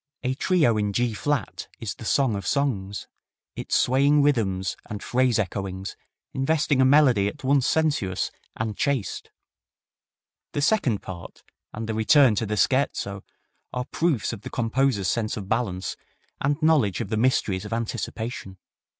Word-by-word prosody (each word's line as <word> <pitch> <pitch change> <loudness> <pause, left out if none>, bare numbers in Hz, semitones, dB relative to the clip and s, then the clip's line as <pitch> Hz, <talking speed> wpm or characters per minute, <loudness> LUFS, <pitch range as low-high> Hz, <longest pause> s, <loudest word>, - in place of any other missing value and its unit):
A 130 0 0
Trio 140 -6 +2
in 105 -1 0
G 120 +1 +1
flat 145 +3 -2
is 115 - -4
the 110 - -11
song 130 -2 +2
of 100 -2 -5
songs, 105 -9 -1 0.5
its - - -2
swaying 140 +3 +4
rhythms 95 -10 +1
and 105 -1 -6
phrase 125 -2 +2
echoings 95 -2 -3 0.4
investing 140 0 +1
a - - +5
melody 130 -7 +5
at 105 - -6
once 135 -1 +3
sensuous 145 -13 0 0.2
and 110 -1 -3
chaste. 135 -8 -2 1.2
The 145 - -1
second 145 - +2
part 85 -2 -9 0.3
and 110 +1 -5
the 110 - -2
return 120 +3 +5
to 110 - 0
the 105 +1 -2
scherzo 105 -6 +1 0.5
are 125 0 -2
proofs 160 -9 0
of 105 - -8
the - - -7
composer's 120 -3 0
sense 110 +3 -1
of 100 -3 -6
balance 100 -5 -1 0.5
and 145 +2 +1
knowledge 140 - +3
of - - -4
the 110 - -1
mysteries 110 -5 +1
of 105 - -8
anticipation. 115 -3 -4
115 Hz, 150 wpm, -25 LUFS, 100-140 Hz, 1.2 s, a